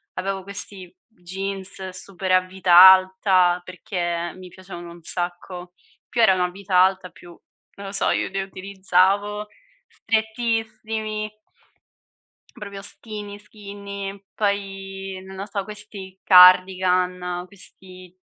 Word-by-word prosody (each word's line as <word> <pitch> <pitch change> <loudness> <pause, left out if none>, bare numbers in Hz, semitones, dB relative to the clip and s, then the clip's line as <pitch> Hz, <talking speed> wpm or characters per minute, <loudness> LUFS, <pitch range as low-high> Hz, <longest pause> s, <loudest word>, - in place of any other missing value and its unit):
avevo 190 +1 -3
questi 195 -2 -5
jeans 190 -1 -7
super 185 0 -6
a 185 0 +5
vita 185 -1 -1
alta 185 -1 +6
perché 175 -2 -4
mi 185 -1 -12
piacevano 175 -1 -10
un 170 -1 -14
sacco. 175 +1 -4 0.4
Più 240 - 0
erano 190 -5 +4
a 180 - -4
vita 195 0 -5
alta, 185 0 +3
più, 175 -1 -16 0.4
non 200 0 -9
lo - - -6
so, 195 - +3
io - - -1
li 195 +1 -3
utilizzavo 195 +2 0 0.4
strettissimi. 220 - -3 1.2
Proprio 200 -1 -9
skinny, 205 -1 -7
skinny, 200 -1 -9
poi, 195 -2 -3
non 190 0 -11
lo 195 - -5
so, 200 -1 -3
questi 205 -2 -10
cardigan, 180 -1 +5
questi, 185 -2 -13
190 Hz, 115 wpm, -22 LUFS, 185-200 Hz, 1.2 s, alta